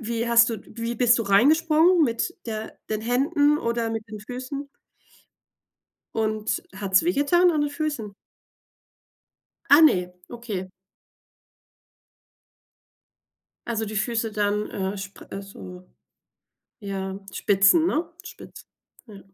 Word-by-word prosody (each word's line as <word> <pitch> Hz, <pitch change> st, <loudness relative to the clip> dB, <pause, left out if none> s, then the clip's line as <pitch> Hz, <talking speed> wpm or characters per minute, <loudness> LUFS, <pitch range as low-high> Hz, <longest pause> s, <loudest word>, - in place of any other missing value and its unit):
wie 230 Hz, 0 st, -3 dB
hast 235 Hz, 0 st, +5 dB
du 225 Hz, -, -4 dB
wie 230 Hz, 0 st, -5 dB
bist 240 Hz, -1 st, +4 dB
du -, -, 0 dB
reingesprungen 315 Hz, -, +4 dB
mit 240 Hz, +7 st, -1 dB
der 220 Hz, -1 st, -6 dB
den 215 Hz, -1 st, -1 dB
Händen 290 Hz, +6 st, +2 dB
oder 235 Hz, -2 st, -1 dB
mit 225 Hz, 0 st, -5 dB
den 215 Hz, 0 st, -8 dB
Füßen? 255 Hz, +6 st, -7 dB, 1.5 s
Und 215 Hz, -1 st, -1 dB
hat's 195 Hz, +2 st, +2 dB
wehgetan 345 Hz, +2 st, +3 dB
an 300 Hz, -, 0 dB
den 290 Hz, -, -1 dB
Füßen? 290 Hz, -9 st, -4 dB, 1.5 s
Ah 285 Hz, +3 st, +8 dB
ne, 180 Hz, -, +5 dB, 0.2 s
okay. 210 Hz, -6 st, -6 dB, 3.0 s
Also 225 Hz, -2 st, -2 dB
die 215 Hz, 0 st, -6 dB
Füße 225 Hz, 0 st, -1 dB
dann, 210 Hz, 0 st, -1 dB
äh, 190 Hz, 0 st, -3 dB
spr 195 Hz, 0 st, -9 dB
also, 185 Hz, -2 st, -10 dB, 0.9 s
ja 195 Hz, -1 st, -5 dB
Spitzen, 200 Hz, -, +4 dB
ne 335 Hz, 0 st, -1 dB, 0.2 s
spitz. -, -, -12 dB, 0.4 s
Ja. 205 Hz, -3 st, -12 dB
230 Hz, 110 wpm, -24 LUFS, 205-285 Hz, 3.0 s, Ah